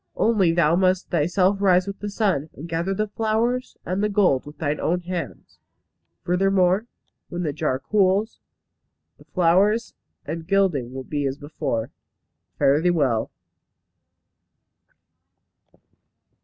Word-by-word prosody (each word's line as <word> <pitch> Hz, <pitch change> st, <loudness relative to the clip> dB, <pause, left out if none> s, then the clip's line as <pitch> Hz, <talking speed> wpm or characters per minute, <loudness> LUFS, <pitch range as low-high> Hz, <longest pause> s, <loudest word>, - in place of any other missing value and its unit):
Only 205 Hz, -7 st, +3 dB
thou 165 Hz, -1 st, +3 dB
must 185 Hz, 0 st, +1 dB
thyself 180 Hz, +4 st, +2 dB
rise 185 Hz, -2 st, +4 dB
with 200 Hz, 0 st, -6 dB
the 205 Hz, -, -4 dB
sun, 195 Hz, -8 st, 0 dB
and 155 Hz, -, -8 dB
gather 170 Hz, +3 st, -2 dB
the 215 Hz, +2 st, -1 dB
flowers 225 Hz, +4 st, -1 dB
and 185 Hz, +3 st, -1 dB
the 210 Hz, -, +2 dB
gold 185 Hz, -11 st, +2 dB
with 150 Hz, -, -11 dB
thine 150 Hz, -1 st, -2 dB
own 180 Hz, +2 st, 0 dB
hands. 175 Hz, -1 st, -6 dB, 0.6 s
Furthermore, 190 Hz, +3 st, +2 dB, 0.4 s
when 175 Hz, +1 st, -4 dB
the 150 Hz, -3 st, -2 dB
jar 130 Hz, -, -1 dB
cools, 200 Hz, -, +1 dB, 0.8 s
the -, -, -18 dB
flowers 195 Hz, +6 st, +2 dB, 0.3 s
and 160 Hz, +2 st, -5 dB
gilding 185 Hz, -11 st, +1 dB
will 130 Hz, 0 st, -6 dB
be 145 Hz, 0 st, -2 dB
as 135 Hz, +1 st, -3 dB
before. 145 Hz, -6 st, -4 dB, 0.7 s
Fare 140 Hz, +3 st, +3 dB
thee 180 Hz, -, +2 dB
well." 135 Hz, -10 st, +1 dB
180 Hz, 130 wpm, -23 LUFS, 155-200 Hz, 0.8 s, rise